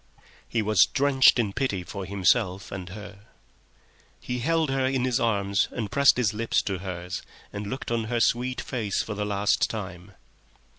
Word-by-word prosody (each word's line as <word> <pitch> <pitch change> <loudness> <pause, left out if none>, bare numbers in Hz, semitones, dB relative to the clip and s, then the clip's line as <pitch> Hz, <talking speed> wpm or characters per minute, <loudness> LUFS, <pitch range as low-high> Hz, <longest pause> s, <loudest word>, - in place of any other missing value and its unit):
He 115 -2 0
was 105 -2 +5
drenched 135 -2 +5
in 105 -5 0
pity 100 -9 -1
for 100 +1 -6
himself 100 0 +1
and 95 -2 -6
her. 100 +1 -10 0.9
He 125 0 -4
held 160 +2 +1
her 135 0 0
in 130 -1 0
his 125 -2 +1
arms, 100 -3 +1
and 110 -5 -5
pressed 140 -2 +5
his 115 -4 +1
lips 115 +2 0
to 95 -3 -3
hers 90 -1 -5 0.3
and 100 0 -5
looked 130 +2 -5
on 115 -1 0
her 120 +1 -1
sweet 125 +2 +1
face 110 -6 -2
for 110 - -5
the 105 0 -3
last 100 0 +1
time. 95 -3 -7
105 Hz, 170 wpm, -26 LUFS, 100-125 Hz, 0.9 s, was